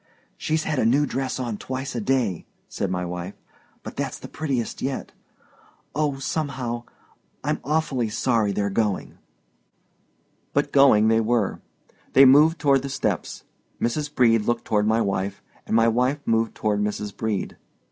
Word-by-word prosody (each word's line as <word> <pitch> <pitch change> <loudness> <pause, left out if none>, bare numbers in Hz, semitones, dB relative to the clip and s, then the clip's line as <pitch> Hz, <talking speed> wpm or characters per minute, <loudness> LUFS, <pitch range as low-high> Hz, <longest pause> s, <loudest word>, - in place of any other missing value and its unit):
"She's 155 0 -1
had 150 - -1
a - - +2
new 135 +6 +3
dress 130 -1 -3
on 120 -5 -3
twice 130 +1 -4
a 120 - -2
day," 115 -7 0 0.2
said 100 - -3
my 90 -1 -2
wife, 90 +2 -5 0.5
"but - - -8
that's - - -3
the - - -9
prettiest 135 -7 -3
yet. 135 0 -3 0.8
Oh, 145 -2 0
somehow—I'm 130 -5 -5
awfully 140 -6 0
sorry 110 -1 +1
they're 100 0 -1
going!" 105 -1 -1 1.3
But - - +1
going 135 -6 +6
they 110 0 +4
were. 115 -3 0 0.5
They 135 - +8
moved 150 +5 +6
toward 140 -2 +3
the 140 - -5
steps. 135 - -2 0.4
Mrs. 145 +5 -1
Brede 115 -3 +4
looked 120 0 -1
toward 105 -1 +1
my 110 +1 +3
wife, 100 -1 -2 0.2
and - - 0
my 115 0 +5
wife 125 +5 +2
moved 115 0 +1
toward 105 -1 0
Mrs. 105 -1 -3
Brede. 110 -3 -3
120 Hz, 150 wpm, -24 LUFS, 105-135 Hz, 1.3 s, They